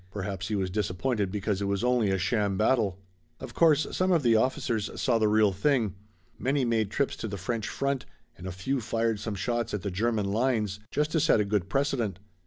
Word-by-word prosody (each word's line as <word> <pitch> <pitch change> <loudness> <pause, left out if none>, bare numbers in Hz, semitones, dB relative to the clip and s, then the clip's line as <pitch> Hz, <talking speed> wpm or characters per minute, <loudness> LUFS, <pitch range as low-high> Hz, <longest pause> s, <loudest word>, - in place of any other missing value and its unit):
Perhaps 95 -1 -4
he 110 - -1
was 95 -2 -1
disappointed 100 +2 -1
because 100 -1 -2
it - - 0
was 100 +1 -1
only 125 -4 +2
a 95 - +1
sham 100 0 0
battle. 110 -4 +2 0.4
Of 130 -3 -8
course 155 -3 +4
some 185 0 +2
of 165 -5 +3
the 115 -2 +4
officers 110 -2 0
saw 120 -4 +2
the 110 - +3
real 105 -1 +4
thing. 110 0 +1 0.5
Many 135 +3 +1
made 110 -3 +1
trips 140 +6 -1
to - - -4
the 100 -1 -5
French 110 +3 -3
front 140 -1 -2 0.3
and 90 - -9
a - - -3
few 120 +9 -2
fired 115 -1 0
some 110 -1 -4
shots 120 +2 -1
at 100 - -5
the 100 - -2
German 110 +2 0
lines 110 -3 0
just 150 +1 0
to 160 - +2
set 155 -7 +4
a 105 - +2
good 100 -2 -1
precedent. 125 -5 0
110 Hz, 210 wpm, -28 LUFS, 100-125 Hz, 0.5 s, course